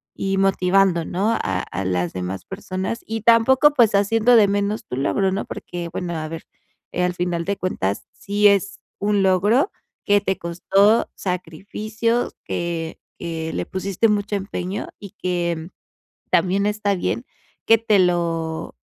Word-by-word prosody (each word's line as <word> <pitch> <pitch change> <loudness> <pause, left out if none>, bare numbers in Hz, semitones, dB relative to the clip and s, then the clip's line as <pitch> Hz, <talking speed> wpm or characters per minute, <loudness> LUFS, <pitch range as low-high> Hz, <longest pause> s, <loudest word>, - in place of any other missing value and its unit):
y 195 0 -1
motivando, 190 -2 +3
¿no?, 195 +7 0
a 95 - -1
a 95 - -5
las 90 -2 -1
demás 95 +1 -5
personas, 190 +2 -4
y 225 0 -3
tampoco, 245 +6 +5
pues, 235 -7 +4
haciendo 225 +4 +4
de 210 -2 +6
menos 205 +2 -1
tu - - -5
logro, 190 +8 +1
¿no?, 195 +2 -2
porque, 175 -1 -6
bueno, 175 -1 -3
a 155 -1 -3
ver, 165 0 -7 0.5
eh, 180 - -1
al 180 0 0
final 175 -1 -2
de 200 - -1
cuentas, 100 - -2
sí 205 +1 +2
es 200 0 +2 0.2
un 205 -1 +1
logro 205 - +3 0.3
que 205 -1 +4
te 190 -1 -1
costó 195 +6 +2
sacrificio, 210 +6 -2 0.2
que 170 -1 -3 0.2
que 160 -1 -4
le 90 - -2
pusiste 195 +3 0
mucho 205 0 0
empeño, 195 0 -4
y 200 -3 -10
que 170 -2 -2 0.6
también 195 +2 +2
está 210 -1 0
bien 235 +6 -2 0.4
que 225 - +7
te 220 -2 +3
lo 165 - 0
195 Hz, 150 wpm, -22 LUFS, 170-210 Hz, 0.6 s, que